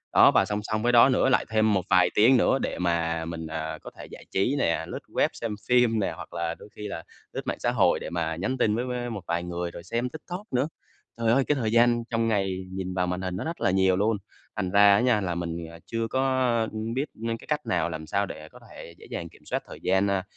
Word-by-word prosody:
Đó, - - +8
và - - +4
song 105 0 -2
song 110 0 -2
với 120 - +3
đó 120 +2 +7
nữa 130 0 +3
lại 125 - +3
thêm 110 -1 +3
một 95 - +2
vài 90 -1 +5
tiếng 120 +5 +6
nữa 135 - +3
để - - -3
mà 85 -2 0
mình, 80 -1 -5
à, 80 0 -4
có - - -9
thể - - -8
giải - - -12
trí 110 +9 +1
nè, 85 - +1
lướt - - -5
web - - +2
xem 115 -3 -4
phim 120 -3 +4
nè, 100 - 0
hoặc - - -10
là 85 0 -2
đôi - - -14
khi 105 - -6
là 85 -5 -6 0.3
lướt - - -3
mạng - - -2
xã - - +1
hội - - +3
để - - -6
mà 80 -2 -2
nhắn 105 +10 -2
tin 110 -4 +2
với 120 +2 -1
với 125 -1 -3
một 110 -4 -5
vài 85 0 -1
người, 90 0 -4
rồi 85 - -9
xem 120 +5 -2
TikTok 175 - -8
nữa. 130 +3 +2 0.5
Trời 115 -1 +2
ơi! 135 +3 +4
Cái 150 - +3
thời 115 -5 -1
gian 120 0 +4
trong 115 -1 0
ngày 95 -4 0
nhìn 95 -1 -4
vào 90 -1 0
màn 90 +1 -2
hình 90 -1 -3
nó 100 - -3
rất 165 +5 -5
là 95 - +3
nhiều 95 0 +3
luôn, 105 +3 +1 0.4
thành 90 - -2
ra 100 0 +7
á - - +3
nha 120 -4 +3
là 90 -3 -2
mình 85 -1 -3
thì, 85 - -6
à, 85 0 -12
chưa 115 -1 -2
có, 130 +3 0 0.5
ừm, 110 +1 -4
biết 135 +4 0
nên 115 +1 -3
cái - - -16
cách 150 -2 -1
nào, 85 -7 0
làm 80 -1 -6
sao 100 +3 +1
để 80 -4 -9
có - - -15
thể 85 - -11
dễ - - -14
dàng - - -5
kiểm - - -20
soát - - -2
thời - - -10
gian, 95 +2 +2
a, 100 -1 0
105 Hz, 275 wpm, -26 LUFS, 90-120 Hz, 0.5 s, Đó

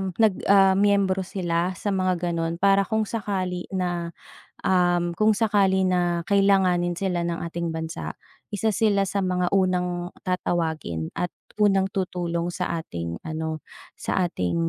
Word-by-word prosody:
nag 220 -4 +3
ah, 195 -1 +6
miyembro 195 -2 +2
sila 175 -1 -1
sa 205 +3 -2
mga 185 -2 0
ganun. 165 0 -1
Para 195 +2 +3
kung 220 -1 +1
sakali 190 -5 -3
na, 175 -2 -2 0.5
um, 175 -2 +2
kung 215 0 +4
sakali 195 -3 +2
na 175 -1 +1
kailanganin 190 -3 +3
sila 180 -3 -1
ng 170 -1 -2
ating 170 -1 -3
bansa, 160 +1 -4 0.4
isa 220 +2 +1
sila 205 -2 +2
sa 200 - -2
mga 180 -1 0
unang 180 -1 0
tatawagin 160 - -2
at 180 - -1 0.3
unang 195 -2 +4
tutulong 175 -3 -2
sa 170 - -2
ating 85 - -5
ano, 160 0 -3 0.4
sa 185 - 0
ating 90 -1 -2
180 Hz, 140 wpm, -25 LUFS, 170-195 Hz, 0.5 s, ah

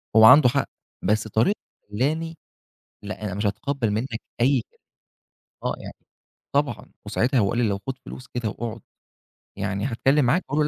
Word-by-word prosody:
هو 110 - +9
عنده 130 +1 +9
حق، - - 0 0.3
بس 105 +3 +1
طريقته 115 - +2 0.3
خلاني 160 +8 -1 0.7
لأ، 105 +1 -6
أنا 95 -3 -3
مش 105 +1 -1
هتقبل 120 +2 -1
منّك 115 +2 -2 0.2
أي 130 -1 +4
كلمة. - - -33 0.8
آه - - 0
يعني - - -8 0.6
طبعًا، - - 0
وساعتها 130 +4 +1
لو 100 -3 +3
قال 120 - -1
لي 115 -3 +3
لو 100 -1 0
خد 135 0 -3
فلوس 125 - -10
كده 120 -3 -2
وأقعد 115 +1 -5 0.8
يعني 100 +2 -2
هاتكلم 135 +3 +2
معاك، 150 +10 +2
هاقول 150 - +1
120 Hz, 165 wpm, -24 LUFS, 110-135 Hz, 0.8 s, هو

